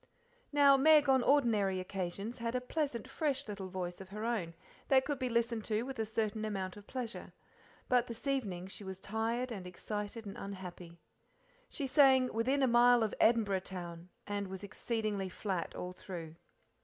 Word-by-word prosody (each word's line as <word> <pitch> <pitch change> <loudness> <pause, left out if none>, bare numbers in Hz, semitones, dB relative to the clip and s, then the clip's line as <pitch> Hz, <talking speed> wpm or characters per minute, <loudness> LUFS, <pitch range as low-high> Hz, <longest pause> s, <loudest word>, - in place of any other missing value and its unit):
Now 285 -1 +6
Meg 300 +1 +6
on 265 -1 +5
ordinary 220 -9 +3
occasions 195 +5 -4
had 230 +1 -2
a - - +2
pleasant, 255 -2 -2
fresh 280 -1 -1
little 195 -2 -5
voice 180 -1 -4
of 190 - -10
her 210 +3 -5
own, 190 -9 -1 0.3
that 265 -1 +5
could 290 -2 -2
be 255 -2 -1
listened 235 -1 0
to 215 +1 0
with 260 -1 -6
a 220 - 0
certain 220 0 -1
amount 195 -3 -3
of 205 0 -13
pleasure, 245 -3 -5 0.5
but 250 -1 +3
this 230 +2 -8
evening 210 -11 -1
she 195 +2 -7
was 190 -1 -7
tired 225 +5 -2
and 190 -5 -5
excited 210 +4 -5
and 200 - -7
unhappy. 180 -3 -8 0.7
She 285 - -3
sang 265 -2 +5
"Within 260 +5 +2
a - - +5
mile 240 0 +6
of 215 - -1
Edinboro' 210 -5 +3
town," 175 -2 -7 0.2
and 205 -1 -2
was 190 +1 -7
exceedingly 210 -2 -2
flat 185 -2 -3
all 180 - -4
through. 175 -3 -7
220 Hz, 175 wpm, -34 LUFS, 190-250 Hz, 0.7 s, Now